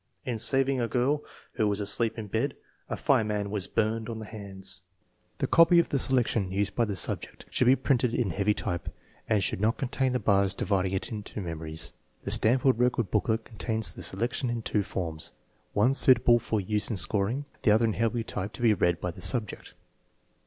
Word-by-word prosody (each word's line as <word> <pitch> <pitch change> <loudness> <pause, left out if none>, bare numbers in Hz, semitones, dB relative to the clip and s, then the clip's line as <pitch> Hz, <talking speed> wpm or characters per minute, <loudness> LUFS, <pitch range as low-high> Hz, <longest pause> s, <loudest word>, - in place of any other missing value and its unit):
In 120 -3 -2
sav 135 +4 +5
ing 135 -2 0
a 115 - 0
girl, 135 +5 0 0.3
who 110 -4 +1
was 100 0 -1
asleep 110 +3 +1
in 110 - -5
bed, 100 - -2 0.3
a - - -3
fireman 105 -2 0
was 100 -3 -2
burned 110 +1 -1
on 115 - -5
the 110 - -7
hands. 100 -3 -4
J 95 - -23 0.5
The - - -1
copy 165 +1 +5
of 170 - +3
the 140 - 0
selection 120 -7 0
used 100 +1 -1
by 120 - +1
the 105 -2 -4
subject - - -3
should 125 - +1
be 130 - +7
printed 125 -4 +1
in 110 -7 0
heavy 100 +4 +1
type 85 -1 -4 0.4
and 105 -3 +2
should 95 - -2
not 110 +2 +1
contain 130 0 -1
the 125 - 0
bars 100 -3 +2
dividing 95 -2 0
it 95 +6 -3
into 105 -1 -6
memories. 80 -3 -4 0.3
The - - -4
Stanford 125 +2 +3
record 120 -4 +1
booklet 110 +1 0
contains 110 -5 -2
the - - -10
selection 120 +5 -2
in 120 -1 -3
two 105 - 0
forms, 80 -5 -5 0.4
one 120 +6 +3
suitable 125 -3 +6
for 110 -1 -2
use 105 +2 -1
in 110 - -2
scoring, 105 +9 +2 0.2
the - - +2
other 110 +2 +4
in 110 - 0
heavy 115 +2 -1
type 105 -1 -5
to - - -7
be 115 -2 +5
read 85 -3 +1
by 90 - -3
the - - -13
subject. 115 -6 -3
110 Hz, 205 wpm, -28 LUFS, 100-120 Hz, 0.5 s, be